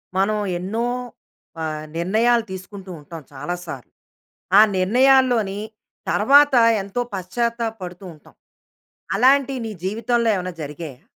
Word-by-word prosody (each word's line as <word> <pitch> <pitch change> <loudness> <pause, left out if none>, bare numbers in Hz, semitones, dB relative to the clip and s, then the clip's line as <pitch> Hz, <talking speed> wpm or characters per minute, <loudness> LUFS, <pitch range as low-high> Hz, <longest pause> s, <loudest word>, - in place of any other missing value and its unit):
మనం 200 +3 +1 0.2
ఎన్నో 215 +6 -2 0.8
ఆహ్, 155 -1 -4
నిర్ణయాలు 225 +7 +2
తీసుకుంటూ 190 0 -9
ఉంటాం 160 +2 -10
చాలా 145 +6 -4
సార్లు. 135 -6 -8 0.7
ఆ - - +10 0.2
నిర్ణయాల్లోని 240 0 +3 0.5
తర్వాత 280 +5 +5 0.3
ఎంతో 200 +5 -3
పశ్చాత్తాప 230 +5 -2
పడుతూ 180 +1 -8
ఉంటాం. 150 - -20 0.8
అలాంటివి 265 +3 +3
నీ 220 - -4
జీవితంలో 230 +3 0
ఏమైనా 185 -1 -4
జరిగాయా? 150 -2 -8
200 Hz, 110 wpm, -21 LUFS, 180-240 Hz, 0.8 s, ఆ